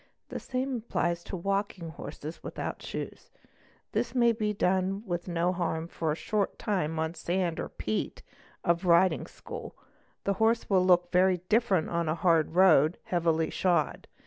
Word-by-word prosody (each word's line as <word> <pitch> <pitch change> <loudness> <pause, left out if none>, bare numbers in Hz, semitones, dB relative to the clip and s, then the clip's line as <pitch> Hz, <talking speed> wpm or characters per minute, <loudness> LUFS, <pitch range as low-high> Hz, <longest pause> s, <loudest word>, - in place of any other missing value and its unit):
| - - -50
The - - -4
same 260 0 -2
applies 175 -6 -1
to - - -5
walking 195 -1 -2
the - - -10
horse 145 -1 -9 0.2
without - - -5
shoés; - - -6 0.6
this - - -1
may 235 -2 +5
be 215 -2 -1
done 190 +1 0
with 175 -2 -3
no 175 +1 +1
harm 165 -2 -2
for 165 -2 -2
a - - 0
short 205 +4 -1
time 165 -6 -1
on 160 0 0
the 170 - -16
sand 175 -1 -1
or - - -3
peat 110 0 -3 0.4
of 170 +1 +1
a - - -3
riding 175 +2 +4
school,—the 200 - -7
horse 225 +3 +2
will 190 -3 +3
look 175 -1 +4
very 180 -1 +3
different 210 -7 +2
on 170 -2 0
a 155 - +1
hard 165 -2 +2
road, 170 -4 +5
heavily 165 -2 +1
shod. 175 -6 0
180 Hz, 170 wpm, -29 LUFS, 165-195 Hz, 0.6 s, may